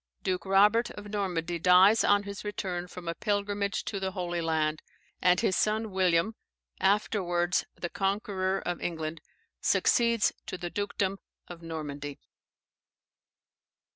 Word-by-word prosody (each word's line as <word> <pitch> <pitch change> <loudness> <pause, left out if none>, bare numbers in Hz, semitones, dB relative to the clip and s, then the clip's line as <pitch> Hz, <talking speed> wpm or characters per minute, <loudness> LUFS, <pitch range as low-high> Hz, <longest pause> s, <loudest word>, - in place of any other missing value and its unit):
Duke 185 +1 -2
Robert 210 +5 +4
of 210 0 -9
Normandy 175 -4 -2
dies 185 +5 +6
on 205 0 +4
his 200 -1 -7
return 185 -4 -3
from 180 -1 -10
a 165 - 0
pilgrimage 205 +1 -1
to 200 - -3
the 190 -1 -3
Holy 175 -2 -2
Land, 155 -1 0 0.4
and 180 0 +4
his 185 - +1
son 215 0 0
William 185 +2 +2 0.5
(afterwards 185 -3 +1
the 175 - -4
conqueror 195 -1 -1
of 175 -1 -3
England) 160 -2 -4 0.4
succeeds 235 -3 +3
to 185 - -4
the 175 -1 -5
dukedom 200 -1 -2 0.3
of 175 -1 -10
Normandy. 145 -3 -6
185 Hz, 130 wpm, -29 LUFS, 175-205 Hz, 0.5 s, dies